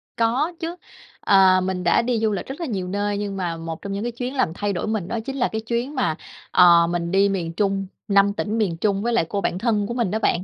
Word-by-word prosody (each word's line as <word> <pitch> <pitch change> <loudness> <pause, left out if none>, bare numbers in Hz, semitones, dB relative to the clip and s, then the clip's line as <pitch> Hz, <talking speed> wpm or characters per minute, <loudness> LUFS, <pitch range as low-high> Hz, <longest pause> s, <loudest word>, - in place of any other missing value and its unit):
Có 255 +9 +1
chứ. 335 +1 -4 0.4
Ờ, 190 -2 +5
mình 185 -1 -2
đã 175 - +4
đi 235 -1 0
du 220 -1 +1
lịch 195 - -3
rất 270 +5 -8
là - - -1
nhiều 195 -8 -3
nơi, 205 +2 -1
nhưng 200 -1 -4
mà 175 -3 -2
một 165 -1 -6
trong 200 -1 -5
những 200 - -3
cái 240 - -2
chuyến 250 +3 -5
làm 255 -11 +1
thay 205 +2 -2
đổi 175 - -3
mình 215 -5 -2
đó 230 - -2
chính 270 - -4
là 245 - +2
cái 220 0 -3
chuyến 240 +5 -3
mà, 205 -12 0 0.4
ờ, 170 -2 +6
mình 170 0 -2
đi 200 +1 +4
miền 170 -4 -2
Trung, 195 +1 0 0.2
5 200 0 +4
tỉnh 215 +2 -2
miền 185 -7 0
Trung 200 +1 0
với 240 +1 0
lại 195 -8 +2
cô 200 -1 -2
bạn 180 - -1
thân 210 -3 0
của 235 - -4
mình 235 -6 -1
đó 220 - 0
bạn. 180 -4 +1
200 Hz, 270 wpm, -22 LUFS, 185-230 Hz, 0.4 s, ờ